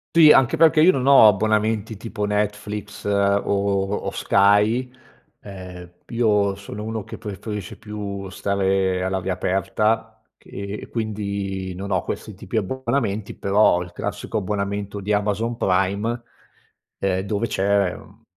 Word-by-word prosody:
Tì, 155 -2 +9
anche 130 -2 +4
perché 160 -1 +5
io 180 +3 +7
non 130 -4 -2
ho 135 -6 +9
abbonamenti 110 +1 0
tipo 110 0 -4
Netflix 105 0 -3
o 100 0 +2
o 100 0 0
Sky. 105 +6 +3 0.5
Ehm, 90 -3 -10 0.2
io 105 -4 +2
sono 100 +1 -8
uno 110 -1 -4
che - - -8
preferisce 105 -1 -6
più 100 -2 -6
stare 95 -1 0
all'aria 95 0 -2
aperta 95 +4 -1 0.2
che 100 +1 -7
e - - -10
quindi, 100 -4 -3
non 100 +2 -6
ho 90 -2 +1
questi - - -5
tipi - - -5
abbonamenti. 115 -2 -2
Però 100 0 +3
ho 90 - -2
il 90 0 -13
classico 110 - -3
abbonamento 100 0 -3
di 105 +2 -1
Amazon 105 +3 0
Prime, 100 +5 0 0.8
ehm, 95 -1 0
dove 105 +3 -1
c'è, 100 -2 +1
mhmm, - - -16
100 Hz, 135 wpm, -22 LUFS, 95-110 Hz, 0.8 s, Tì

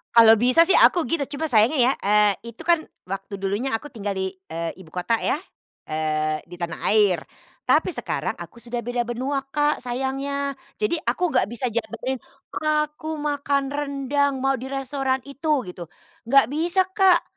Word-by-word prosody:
Kalau 225 -1 +9
bisa 255 +9 +5
sih 390 - +5
aku 345 -3 +5
gitu, 325 -3 0
cuma 290 +3 -4
sayangnya 245 +2 +4
ya, - - +4
eee, 210 +2 +2
itu 230 - -14
kan 335 -2 +4 0.2
waktu 195 +1 -5
dulunya 205 +7 -1
aku 225 +6 -2
tinggal 210 -6 -5
di, 190 -1 -1 0.2
eee, 165 0 -3
ibukota 180 +5 -2
ya, 295 - +1 0.5
eee, 155 0 -1
di 175 - -10
tanah 170 -1 -5
air. 200 -6 +4 0.4
Tapi - - +2
sekarang - - -3
aku 235 - -11
sudah 235 +1 -5
beda 240 0 -2
benua, 260 +4 -1
Kak, 295 +2 +1
sayangnya. 270 +3 -2 0.2
Jadi 340 -6 0
aku 355 -3 +1
nggak 255 - +2
bisa 235 +2 -3
jabanin, 235 +3 -3 0.3
"Aku 305 0 -1
makan 285 -2 -1
rendang, 280 -1 -1
mau 270 -2 +1
di 260 - -6
restoran 270 -1 -2
itu." 285 0 -1
Gitu. 175 -2 -9 0.4
Nggak 275 -1 +6
bisa, 345 +5 +2
Kak, 380 -4 +4
265 Hz, 160 wpm, -23 LUFS, 220-290 Hz, 0.5 s, Kalau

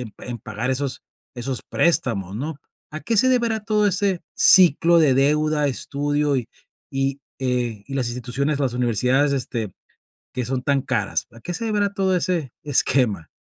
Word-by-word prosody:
en 110 -4 -10
en 120 -1 -6
pagar 115 +2 -4
esos 135 0 -2 0.3
esos 125 +1 -4
préstamos, 115 - +1
¿no? 145 +3 -5 0.3
¿A 155 - -5
qué 230 - -1
se 260 +5 +5
deberá 235 -4 +1
todo 210 -1 +2
ese 195 -2 0
ciclo 170 -2 +6
de 145 -5 +4
deuda, 150 +2 +2
estudio 145 +1 -1
y 125 - -3 0.5
y, 135 0 -1 0.2
eh, 125 -5 -1
y 135 - -5
las 130 -3 0
instituciones, 125 +5 -2
las 135 -3 0
universidades, 125 +4 +1
este, 120 -6 -3 0.6
que 125 -1 -2
son 130 +1 -2
tan 140 0 +1
caras? - - -1
¿A 115 - -15
qué 175 - -5
se 230 - -4
deberá 205 -2 0
todo 190 -2 +1
ese 170 -7 -1
esquema? 125 - +1
140 Hz, 165 wpm, -22 LUFS, 125-170 Hz, 0.6 s, ciclo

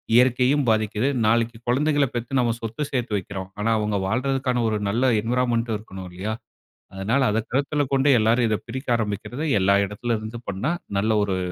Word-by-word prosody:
இயற்கையும் 125 +3 +4
பாதிக்குது. 110 +3 +1 0.2
நாளைக்கு 115 +1 +1
குழந்தைகள 145 +3 +2
பெத்து 120 +3 -2
நாம 120 -2 +2
சொத்து 115 +5 -5
சேர்த்து 125 -4 -2
வைக்கிறோம். 95 0 -6
ஆனா 115 - +1
அவங்க 105 -1 0
வாழ்றதற்கான 125 +1 0
ஒரு 110 - -1
நல்ல 125 +5 +2
என்விரான்மென்ட்‌டும் 115 -1 0
இருக்கணும் 95 -3 -9
இல்லையா? 100 +5 -4 0.6
அதனால 110 +8 0
அத 110 - +1
கருத்தில 145 +3 +1
கொண்டு 135 +1 +3
எல்லாரும் 115 +2 +3
இத 110 - +2
பிரிக்க 130 +3 -5
ஆரம்பிக்கிறது, 110 +7 -3 0.2
எல்லா 100 +1 +4
இடத்துல 115 +3 -2
இருந்து 110 +2 -7
பண்ணா, 100 - -1 0.3
நல்ல 110 +2 +1
ஒரு 95 -2 -1
115 Hz, 160 wpm, -23 LUFS, 105-130 Hz, 0.6 s, இயற்கையும்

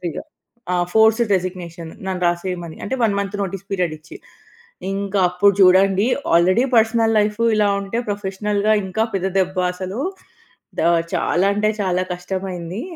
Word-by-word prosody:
వాలంటరీగా 175 -2 -4 0.5
ఆ! - - +2 0.2
Forced 220 0 +4
resignation 175 -3 -6 0.2
నన్ను 185 -1 -3
రాసేయమని. 175 -1 -3
అంటే 235 - -2
1 210 -3 +2
మంత్ 200 +1 -3
నోటీస్ 195 0 -5
పీరియడ్ 180 -5 -1
ఇచ్చి. 155 - -13 0.8
ఇంకా 200 0 -2
అప్పుడు 200 +3 +3
చూడండి, 195 +2 +5 0.3
ఆల్రెడీ 185 +8 +4
పర్సనల్ 225 0 +3
లైఫ్ 210 +1 0 0.2
ఇలా 210 -1 +3
ఉంటే, 200 +4 -4
ప్రొఫెషనల్‌గా 205 +1 -1
ఇంకా 220 +4 -1
పెద్ద 190 0 0
దెబ్బ 190 0 0 0.2
అసలు. 185 +5 -5 0.8
ద - - +2 0.3
చాలా 185 +3 +1
అంటే 210 +1 +1
చాలా 185 -2 0
కష్టమైంది. 180 +1 -5
195 Hz, 140 wpm, -20 LUFS, 180-205 Hz, 0.8 s, చూడండి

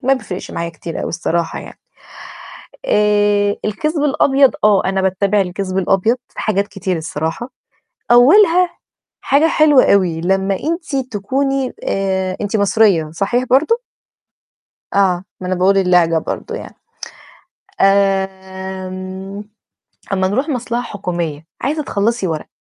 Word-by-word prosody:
ما 270 +2 +3
بيفرقش 205 -7 -7
معايا 170 - -3
كتير 165 0 -7
أوي - - -3
الصراحة 170 0 -2
يعني. - - -11 1.1
آآ 205 - +2
الكذب 295 +8 -1
الأبيض 275 -2 +3
آه 210 -2 +4
أنا 190 0 0
باتّبع 195 +2 +1
الكذب 185 0 -3
الأبيض 195 +5 +2
في - - -11
حاجات 200 -1 0
كتير 190 -3 -3
الصراحة، 160 - -4 0.6
أولها 345 - +5 0.5
حاجة 300 +4 +3
حلوة 300 -4 +5
أوي 175 -5 +1
لما 195 +2 +1
أنتِ 320 -2 -3 0.2
تكوني 270 +5 -1
آآ 190 -1 -1
أنتِ 210 +1 -1
مصرية، 200 -6 +3
صحيح 220 +8 0
برضه؟ 315 - +2 1.1
آه، 190 -2 +2 0.2
ما 180 - -4
أنا 185 - 0
باقول 190 +2 +3
اللهجة 180 -3 +3
برضه - - -4
يعني. - - -9 1.1
آمم 190 0 -1 0.7
أمّا 190 -1 +1
نروح 265 +10 -1
مصلحة 245 -3 -2
حكومية، 175 -8 -4
عايزة 305 +2 -1
تخلّصي 225 -4 -1
ورق 160 -2 -3
195 Hz, 120 wpm, -17 LUFS, 185-245 Hz, 1.1 s, أولها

